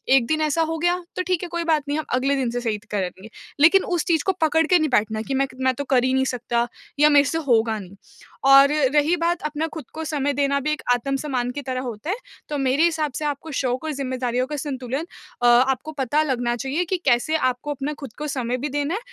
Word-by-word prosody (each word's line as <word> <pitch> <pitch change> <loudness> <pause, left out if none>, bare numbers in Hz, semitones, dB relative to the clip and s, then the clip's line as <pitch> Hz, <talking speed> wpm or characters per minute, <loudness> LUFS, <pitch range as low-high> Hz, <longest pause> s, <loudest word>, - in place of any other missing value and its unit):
1 255 -3 +4
दिन 310 +3 0
ऐसा 310 +1 +1
हो 325 0 -2
गया 350 +2 +1
तो - - -1
ठीक 365 -2 0
है 355 - -5
कोई 340 0 -2
बात 315 -3 +1
नहीं 290 +1 -1
हम 310 - -3
अगले 270 +3 +2
दिन 260 -3 0
से 245 +1 -3
सही 225 -3 -1
करेंगे। 190 0 -4 0.3
लेकिन 335 +6 +6
उस 350 -3 -1
चीज़ 325 -4 +1
को 385 - +3
पकड़ 320 +1 +3
के 360 +1 +5
नहीं 310 -1 +1
बैठना 220 -3 +1
कि 270 - -4
मैं 275 +1 +1 0.2
मैं 260 0 +3
तो 285 - -3
कर 250 -2 +4
ही 260 0 +1
नहीं 265 0 +2
सकता 240 -2 -1 0.3
या 300 +1 +6
मेरे 285 - +6
से 325 - -1
होगा 225 -2 +3
नहीं। 195 -1 -11 0.5
और 275 +1 +8 0.3
रही 300 +4 +4
बात 340 +1 0
अपना 305 +1 -2
खुद 315 -5 -7
को 320 - -5
समय 285 -2 -1
देना 280 0 +1
भी 290 +3 -1
एक 305 - -3
आत्मसम्मान 260 0 -2
की 285 +3 -5
तरह 255 -2 -3
होता 245 +3 -6
है। 385 - +1 0.3
तो 295 - -2
मेरे 270 +2 +2
हिसाब 320 -3 +1
से 305 - -3
आपको 295 +2 -4
शौक 255 0 -1
और 315 - -2
ज़िम्मेदारियों 255 -2 -2
का 300 - -4
संतुलन 270 0 -4 0.4
अ, - - +1
आपको 260 +5 +3
पता 290 +1 0
लगना 245 -4 -1
चाहिए 270 +8 -2
कि 375 +2 -1
कैसे 260 +4 +2 0.2
आपको 250 +4 -7
अपना 285 +1 -3
खुद 275 -7 -8
को 300 - -4
समय 250 -4 -2
भी 285 +4 -3
देना 290 +3 -1
है - - -2
280 Hz, 245 wpm, -23 LUFS, 250-310 Hz, 0.5 s, और